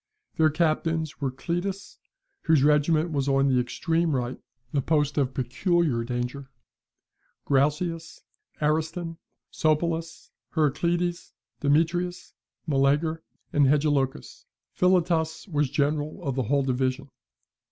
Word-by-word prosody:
Their 160 Hz, -1 st, +4 dB
captains 160 Hz, -1 st, -1 dB
were 135 Hz, -, 0 dB
Cleitus 175 Hz, +9 st, -4 dB, 0.5 s
(whose 160 Hz, -4 st, +4 dB
regiment 155 Hz, +3 st, +3 dB
was 140 Hz, -2 st, -1 dB
on 135 Hz, 0 st, +3 dB
the 130 Hz, -1 st, +3 dB
extreme 160 Hz, +5 st, 0 dB
right, 125 Hz, 0 st, -3 dB, 0.3 s
the 145 Hz, -3 st, +1 dB
post 150 Hz, 0 st, +1 dB
of 135 Hz, -3 st, 0 dB
peculiar 135 Hz, 0 st, +1 dB
danger), 125 Hz, +3 st, -4 dB, 1.0 s
Graucias, 150 Hz, +4 st, 0 dB, 0.4 s
Ariston, 160 Hz, +2 st, -1 dB, 0.3 s
Sopolis, 165 Hz, +1 st, -1 dB, 0.2 s
Heracleides, 170 Hz, +3 st, 0 dB, 0.3 s
Demetrias, 170 Hz, +5 st, 0 dB, 0.3 s
Meleager, 150 Hz, +2 st, +1 dB, 0.3 s
and 145 Hz, -2 st, +4 dB
Hegelochus. 140 Hz, -2 st, 0 dB, 0.3 s
Philotas 170 Hz, -2 st, +1 dB
was 150 Hz, -6 st, 0 dB
general 150 Hz, +2 st, -1 dB
of 135 Hz, -, -1 dB
the 130 Hz, 0 st, -1 dB
whole 140 Hz, 0 st, +3 dB
division. 130 Hz, +1 st, -1 dB
150 Hz, 105 wpm, -26 LUFS, 140-165 Hz, 1.0 s, Their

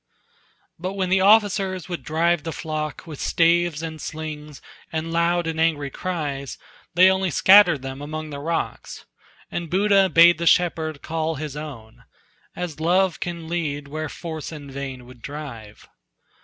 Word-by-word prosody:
But 185 Hz, +3 st, -3 dB
when 190 Hz, -2 st, -1 dB
the 190 Hz, 0 st, +3 dB
officers 195 Hz, -3 st, +3 dB
would 175 Hz, -2 st, -5 dB
drive 165 Hz, +1 st, +1 dB
the 165 Hz, -, -5 dB
flock 155 Hz, -1 st, -4 dB
With 155 Hz, -4 st, -9 dB
staves 170 Hz, -1 st, +2 dB
and 160 Hz, -1 st, -6 dB
slings 150 Hz, -2 st, -7 dB, 0.3 s
and 160 Hz, +1 st, -3 dB
loud 170 Hz, +1 st, +2 dB
and 165 Hz, -1 st, -3 dB
angry 150 Hz, -4 st, +1 dB
cries, 145 Hz, -7 st, -4 dB, 0.4 s
They 180 Hz, +1 st, +7 dB
only 190 Hz, 0 st, 0 dB
scattered 175 Hz, -3 st, +6 dB
them 135 Hz, +1 st, -6 dB
among 155 Hz, +1 st, -6 dB
the 140 Hz, -, -6 dB
rocks, 165 Hz, +3 st, -4 dB, 0.5 s
And 170 Hz, -2 st, -4 dB
Buddha 195 Hz, +1 st, +4 dB
bade 170 Hz, -1 st, +6 dB
the 170 Hz, -, -1 dB
shepherd 160 Hz, -4 st, +2 dB
call 160 Hz, 0 st, -2 dB
his 150 Hz, -1 st, -6 dB
own, 135 Hz, -8 st, -9 dB, 0.5 s
As 170 Hz, -4 st, -5 dB
love 180 Hz, +2 st, +2 dB
can 170 Hz, -2 st, -5 dB
lead 150 Hz, -4 st, -3 dB
where 155 Hz, +1 st, -4 dB
force 160 Hz, -3 st, -6 dB
in 145 Hz, -3 st, -9 dB
vain 135 Hz, -2 st, -6 dB
would 125 Hz, -1 st, -15 dB
drive. 125 Hz, -8 st, -9 dB
160 Hz, 155 wpm, -23 LUFS, 150-175 Hz, 0.5 s, They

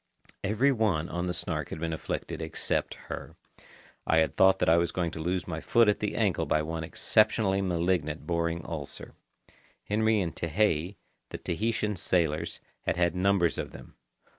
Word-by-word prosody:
Every 110 Hz, +8 st, +3 dB
one 105 Hz, -, +1 dB
on 85 Hz, +1 st, -2 dB
the 90 Hz, -, -1 dB
Snark -, -, -3 dB
had -, -, -5 dB
been 80 Hz, 0 st, -2 dB
afflicted 80 Hz, -, -4 dB
except -, -, -2 dB
her. -, -, -8 dB, 0.7 s
I 80 Hz, -, +4 dB
had 80 Hz, 0 st, +2 dB
thought 95 Hz, 0 st, +6 dB
that -, -, 0 dB
I 80 Hz, +1 st, +6 dB
was 85 Hz, -1 st, +1 dB
going 85 Hz, -2 st, -1 dB
to 80 Hz, -, -7 dB
lose 90 Hz, +3 st, -1 dB
my 80 Hz, -2 st, -3 dB
foot 115 Hz, +6 st, +4 dB
at 105 Hz, -, +3 dB
the -, -, -2 dB
ankle -, -, +1 dB
by 75 Hz, -, +2 dB
one 80 Hz, +1 st, -3 dB
exceptionally 110 Hz, +1 st, +2 dB
malignant 85 Hz, -4 st, 0 dB
boring 85 Hz, -1 st, -1 dB
ulcer. 75 Hz, -4 st, -6 dB, 0.7 s
Henry 110 Hz, +1 st, +2 dB
and 85 Hz, -5 st, -2 dB
Tehei, 85 Hz, +1 st, 0 dB, 0.3 s
the -, -, -5 dB
Tahitian 105 Hz, +3 st, -1 dB
sailors, 85 Hz, -2 st, 0 dB, 0.3 s
had 85 Hz, -, +1 dB
had 85 Hz, -1 st, +2 dB
numbers 90 Hz, -2 st, +2 dB
of -, -, -5 dB
them. -, -, -12 dB
85 Hz, 170 wpm, -29 LUFS, 80-100 Hz, 0.7 s, thought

